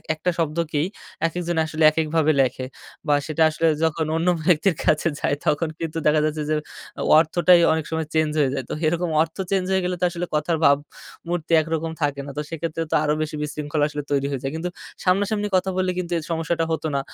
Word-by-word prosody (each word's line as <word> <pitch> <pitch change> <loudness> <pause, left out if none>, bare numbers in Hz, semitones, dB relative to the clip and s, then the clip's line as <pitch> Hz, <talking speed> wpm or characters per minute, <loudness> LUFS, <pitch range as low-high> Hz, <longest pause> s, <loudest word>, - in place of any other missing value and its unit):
একটা 170 +4 -1
শব্দকেই 160 0 0 0.4
একেকজন 175 0 -3
আসলে 155 0 -2
একেকভাবে 155 0 +1
লেখে 130 0 -1 0.4
বা 145 - +4
সেটা 160 +1 +1
আসলে 160 +1 0 0.2
যখন 160 0 +1
অন্য 165 +2 0 0.2
ব্যক্তির 175 +1 +3
কাছে 155 +2 +3
যায় 145 - +1
তখন 155 +2 +1
কিন্তু 165 -1 -4
দেখা 150 0 +4
যাচ্ছে 155 0 -2
যে 155 - +2 0.6
অর্থটাই 170 +2 +5
অনেক 160 -1 -2
সময় 160 -1 -2
চেঞ্জ 155 -1 +2
হয়ে 135 -3 +2
যায়। 135 - -2
তো - - -3
এরকম 170 +1 0
অর্থ 160 +2 -2
চেঞ্জ 190 -2 +1
হয়ে 190 0 +2
গেলে 180 0 -1
তো - - -1
আসলে 175 0 -4
কথার 160 +2 0
ভাবমূর্তি 155 +3 -1
একরকম 160 0 -3
থাকে। 145 -1 0 0.2
তো - - 0
সেক্ষেত্রে 165 0 -4
তো - - +2
আরো 150 -1 +2
বেশি 155 0 -3
বিশৃঙ্খলা 150 0 -2
আসলে 150 0 -5
তৈরি 140 -1 +1
হয়ে 135 - -3
যায়। 135 - -2
কিন্তু 170 +2 -3 0.3
সামনাসামনি 205 +3 +1
কথা 185 +1 +2
বললে 185 0 +1
কিন্তু 180 -1 -5
এই 160 - -4
সমস্যাটা 165 0 0
হত 160 - -2
না। - - +2
160 Hz, 195 wpm, -23 LUFS, 150-170 Hz, 0.6 s, অর্থটাই